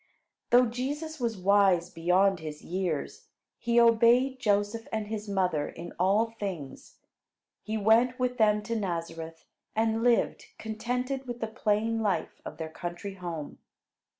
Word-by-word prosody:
Though 245 +1 +6
Jesus 285 +6 -4
was 230 -3 -1
wise 190 -2 +3
beyond 180 +3 +2
his 155 -1 -7
years, 175 -5 -3 0.3
he 235 0 +2
obeyed 235 +3 +4
Joseph 205 +1 0
and 215 -1 -3
his 215 -1 -5
mother 180 -7 0
in 170 +1 -9
all 205 +5 +3
things. 170 -10 -6 0.6
He 220 +1 -3
went 230 +4 +4
with 250 -1 -1
them 210 -1 +3
to 230 +2 -3
Nazareth, 165 -5 -4 0.3
and 225 0 +1
lived 240 0 +2
contented 250 +5 -3
with 240 -1 -5
the 225 - -1
plain 220 +1 0
life 205 -3 -1
of 155 - -8
their 160 0 -5
country 175 +4 -6
home. 170 -5 -6
210 Hz, 140 wpm, -28 LUFS, 180-235 Hz, 0.6 s, Though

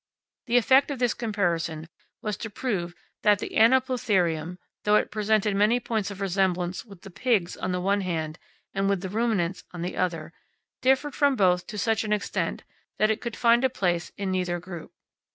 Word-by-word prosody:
The 240 +1 +3
effect 260 +4 +5
of 285 - -3
this 245 -2 +1
comparison 170 -8 -1 0.4
was 210 -1 -1
to 225 - -5
prove 195 -6 -3 0.3
that 210 -1 +5
the - - -6
Anoplotherium, 210 - +2 0.3
though 210 0 +4
it - - +2
presented 215 -1 +1
many 210 +4 +3
points 220 -5 -2
of 200 -1 -8
resemblance 185 -2 0
with 200 -6 -15
the 195 - -10
pigs 200 -4 0
on 185 - -3
the 180 - -1
one 200 +2 +1
hand 160 -4 -3 0.3
and 195 0 0
with 200 -3 +1
the 190 - -4
ruminants 205 -4 0
on 175 -1 -6
the 180 - -4
other, 170 -3 -2 0.5
differed 265 +2 +2
from 285 -2 +3
both 180 -4 +2
to 210 - -7
such 225 +2 +1
an 210 -1 0
extent 210 - -2 0.3
that 215 +1 +3
it 220 - -2
could 235 -2 -4
find 235 +1 +4
a 260 - +4
place 175 -7 -1
in 195 -1 -2
neither 180 -2 -1
group. 175 -2 -9
200 Hz, 190 wpm, -26 LUFS, 180-225 Hz, 0.5 s, effect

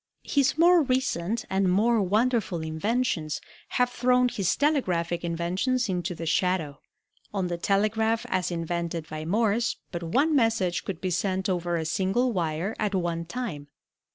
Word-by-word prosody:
His 280 0 +1
more 345 +1 +6
recent 235 - -1
and 190 -1 +1
more 220 +4 +3
wonderful 210 -2 +1
inventions 160 0 -1 0.3
have 250 0 +1
thrown 250 0 +3
his 195 -6 0
telegraphic 180 - 0
inventions 180 +10 0
into 180 -1 -2
the 165 - -6
shadow. 160 -4 0 0.6
On 185 -3 0
the 175 - -2
telegraph 220 +4 +1
as 185 -1 0
invented 170 -1 -3
by 155 0 -6
Morse 225 +5 +1 0.2
but 170 - -4
one 275 - +2
message 225 -8 +1
could 185 -3 -5
be 185 - -1
sent 190 +1 0
over 175 -2 0
a 160 - -2
single 195 +9 +1
wire 170 +3 -2
at 210 -2 0
one 170 -2 -1
time. 170 -8 -5
190 Hz, 150 wpm, -26 LUFS, 170-235 Hz, 0.6 s, more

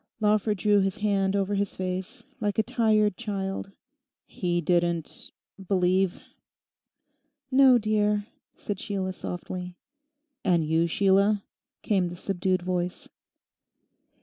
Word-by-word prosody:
Lawford 210 -1 +2
drew 205 +2 +3
his 195 -1 0
hand 200 -2 +1
over 200 0 0
his 200 -1 -1
face, 185 0 -4 0.2
like 205 -1 -1
a 220 - +3
tired 215 -4 +2
child. 195 -3 -4 0.5
'He 175 -2 -2
didn't—believe?' 180 +2 -1 1.3
'No, 260 -1 +7
dear,' 210 -2 +1 0.3
said 205 -2 -4
Sheila 190 -2 -3
softly. 180 0 -6 0.7
'And 170 -3 +2
you, 160 +2 +2
Sheila?' 200 +3 +3 0.4
came 190 -4 +1
the 175 - -7
subdued 185 0 -1
voice. 180 0 -3
195 Hz, 105 wpm, -27 LUFS, 180-210 Hz, 1.3 s, No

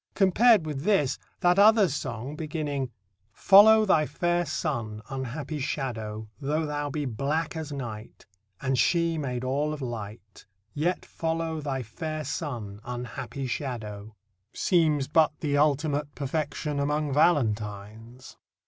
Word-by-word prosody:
Compared 210 0 +5
with 150 -3 -4
this, 150 -8 +2 0.2
that 180 +2 +4
other 215 -1 +7
song 135 -2 -4
beginning: 150 -4 -3 0.4
Follow 215 - +7
thy 155 -6 +3
fair 175 -1 0
sun, 115 -9 -3
unhappy 135 +3 -4
shadow, 110 -6 -4
Though 150 +3 -1
thou 145 -1 -3
be 145 +1 -3
black 140 +8 -2
as 160 -2 -5
night, 120 -6 -7 0.3
And 130 -2 0
she 170 -2 +2
made 125 -4 -3
all 145 +4 0
of 155 - -6
light, 105 -5 -8 0.3
Yet 170 +5 -1
follow 165 -1 -2
thy 135 -3 -3
fair 155 +8 -5
sun, 120 -9 -5
unhappy 125 +2 -5
shadow 110 -5 -5 0.4
seems 155 -6 +2
but 155 +1 +3
the 145 -2 -1
ultimate 145 0 +1
perfection 145 +1 -2
among 150 0 0
valentines. 115 - -1
145 Hz, 125 wpm, -27 LUFS, 125-160 Hz, 0.4 s, other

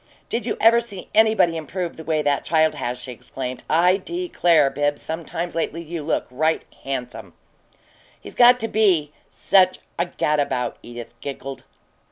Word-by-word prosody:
"Did 240 +1 -2
you 220 - -1
ever 230 +1 +6
see 205 -6 -9
anybody 220 -6 +4
improve 170 +2 -4
the 160 - -9
way 155 -1 0
that 145 -1 +1
child 160 -1 +2
has!" 125 +1 -3
she 125 +1 -7
exclaimed. 125 +1 -6
"I 180 +4 +4
declare, 175 - +1
Bibbs, 145 0 0
sometimes 165 +1 -5
lately 165 0 -2
you 165 0 -5
look 145 - -1
right 155 +5 0 0.2
handsome!" 125 -8 -5 0.9
"He's - - -10
got 245 0 +6
to 225 - -1
be 185 -10 +2 0.2
such 185 -1 +3 0.2
a 170 - +1
gadabout," 145 -7 -1
Edith 120 0 -9
giggled. 135 -1 -7
160 Hz, 155 wpm, -22 LUFS, 140-185 Hz, 0.9 s, ever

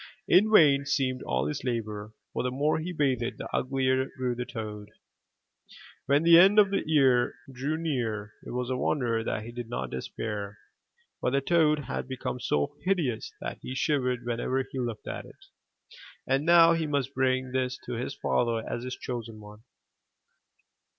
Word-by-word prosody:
In 210 +4 +5
vain 145 -9 +6
seemed 135 -3 0
all 65 +1 -1
his 75 - -3
labor, 110 -3 -3 0.2
for - - -1
the 125 - -1
more 145 +5 +1
he 170 +3 -4
bathed, 130 -7 0
the - - -6
uglier 130 0 +1
grew 125 -1 -1
the 125 +1 -5
toad. 105 -2 -6 1.2
When 140 +3 +3
the 170 0 +8
end 195 +4 +6
of 200 -2 +6
the 200 - +1
year 135 -6 +3 0.2
drew 140 +5 -2
near 115 -10 -2
it - - -9
is 125 +1 -3
a - - 0
wonder 120 -4 0
that 110 -1 -2
he 115 - -8
did 120 -1 -7
not 65 - -4
despair; 100 - -5 0.6
for - - 0
the 140 +2 +2
toad 150 0 +2
had - - -4
become 130 -1 -4
so 75 -11 0
hideous 170 - 0
that - - -5
he 130 - -6
shivered 125 -4 0
whenever 120 +2 -1
he 135 - -4
looked 120 -3 -4
at - - -5
it. - - -16 0.8
And 135 +4 0
now 170 -1 +7
he 165 -2 -1
must 140 -2 -1
bring 130 -1 0
this 130 0 -1
to - - -5
his 125 +3 -4
father 115 -2 0
as 120 - -4
his 130 0 -4
chosen 115 -3 -6
one. 105 0 -13
130 Hz, 175 wpm, -28 LUFS, 115-145 Hz, 1.2 s, the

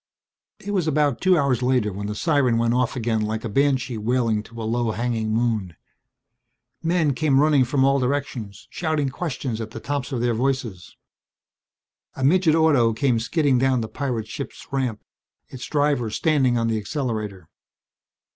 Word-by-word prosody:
It 205 - -6
was 180 -5 0
about 145 -4 +1
two 185 -2 +4
hours 135 -5 +1
later 125 -5 +1
when 100 +2 -5
the 105 - -4
siren 140 -5 +2
went 115 0 +1
off 125 0 0
again 115 -3 0
like 110 +1 -2
a - - 0
banshee 130 -1 +1
wailing 115 -1 +1
to 115 +2 -12
a - - -4
low 115 +1 0
hanging 115 -1 -2
moon. 110 -6 -1 1.1
Men 165 -3 +1
came 140 -1 +2
running 145 -2 +4
from 135 +1 +1
all 135 0 +3
directions, 125 -6 -3
shouting 155 -4 -1
questions 130 -6 -4
at 110 - -5
the - - -8
tops 145 -1 -3
of 130 - -2
their 120 0 +1
voices. 120 -6 -3 1.2
A 130 - -4
midget 160 +2 +4
auto 145 -8 +4
came 115 +1 +1
skidding 140 +1 +1
down 130 -1 +2
the 110 - -3
pirate 120 -5 -3
ship's 120 +5 -7
ramp, 130 -6 -2 0.5
its 130 - -8
driver 145 -6 +1
standing 130 0 +2
on 115 0 +1
the 110 -1 0
accelerator. 105 - -4
125 Hz, 165 wpm, -23 LUFS, 115-145 Hz, 1.2 s, two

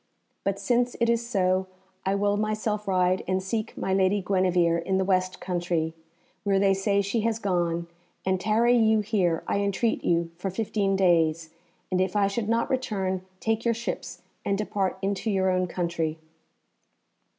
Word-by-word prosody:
But 195 0 0
since 240 +5 +1
it 235 0 +3
is 235 0 +1
so, 185 -3 +1 0.4
I 195 - +2
will 205 0 +1
myself 215 0 -1
ride 185 -1 +2
and 185 0 +1
seek 215 +3 -3
my 190 - -1
lady 190 +1 +3
Guenevere 180 -3 +2
in 190 +3 0
the 190 - +1
west 185 -1 +1
country, 175 -3 -1 0.5
where 200 -1 +2
they 195 0 +4
say 200 +1 +1
she 210 +4 -1
has 225 0 0
gone, 175 -5 0 0.4
and 190 -1 +1
tarry 230 +4 +3
you 220 -2 +4
here, 195 -6 0
I - - 0
entreat 200 +3 0
you, 170 -1 +1
for 195 +2 -3
fifteen 200 0 0
days, 165 -4 +2 0.4
and 185 0 +2
if 185 +1 -1
I 205 -1 +4
should 205 +2 -2
not 230 +3 +1
return 195 -8 -1 0.2
take 225 0 0
your 235 -1 +2
ships 235 +1 -5 0.2
and 200 - 0
depart 195 -2 -1
into 200 +2 -1
your 190 -2 +2
own 185 0 +1
country." 170 -3 -2
195 Hz, 170 wpm, -26 LUFS, 185-215 Hz, 0.5 s, they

